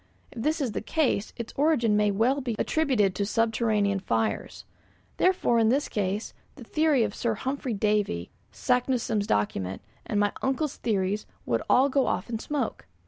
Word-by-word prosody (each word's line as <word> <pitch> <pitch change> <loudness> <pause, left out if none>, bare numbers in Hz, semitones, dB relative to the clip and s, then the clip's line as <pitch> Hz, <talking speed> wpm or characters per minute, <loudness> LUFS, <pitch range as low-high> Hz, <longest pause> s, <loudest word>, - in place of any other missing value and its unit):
If 230 - -7
this 310 +6 0
is 255 -5 -1
the - - -3
case, 250 -6 0
its 235 -1 -6
origin 275 -8 +3
may 210 0 +3
well 235 +8 +2
be 240 -4 -2
attributed 255 -12 +1
to 200 - -1
subterranean 215 -2 +1
fires. 115 -11 -2 0.5
Therefore, 360 -10 +3
in 220 -1 +4
this 275 +4 +1
case, 205 +1 -2 0.2
the - - -11
theory 305 0 +2
of 210 -2 -2
Sir 230 0 -1
Humphry 260 0 -3
Davy, 205 - 0 0.2
Saknussemm's 245 -4 0
document, 95 -2 -1 0.2
and 205 - 0
my 205 0 +2
uncle's 270 +2 -1
theories 205 -2 -1 0.2
would 115 -1 0
all 260 +2 +5
go 275 -1 +1
off - - -2
in 225 - -2
smoke. 275 - -3
225 Hz, 165 wpm, -27 LUFS, 205-265 Hz, 0.5 s, all